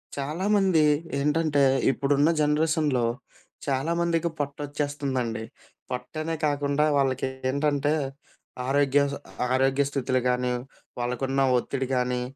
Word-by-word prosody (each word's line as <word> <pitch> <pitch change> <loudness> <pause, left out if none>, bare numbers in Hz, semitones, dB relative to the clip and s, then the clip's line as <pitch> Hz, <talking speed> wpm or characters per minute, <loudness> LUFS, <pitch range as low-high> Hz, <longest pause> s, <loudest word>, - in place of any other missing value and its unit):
చాలామంది 180 +4 +2 0.4
ఏంటంటే 150 0 +2 0.3
ఇప్పుడున్న 140 +2 +2
జనరేషన్‌లో 150 -4 +2 0.6
చాలామందికి 165 +4 0
పొట్టొచ్చేస్తుందండి. 140 -5 -2 0.5
పొట్టనే 155 +6 -3 0.2
కాకుండా 145 +1 +1
వాళ్ళకి 135 -1 +1 0.2
ఏంటంటే 145 +1 +1 0.7
ఆరోగ్య 140 0 +3
స - - -3 0.4
ఆరోగ్య 135 +2 +3
స్థితులు 130 -2 0
గానీ 125 0 0 0.5
వాళ్ళకున్న 130 +3 -1 0.2
ఒత్తిడి 130 +2 -2
గానీ 125 0 0
140 Hz, 85 wpm, -26 LUFS, 130-150 Hz, 0.7 s, ఆరోగ్య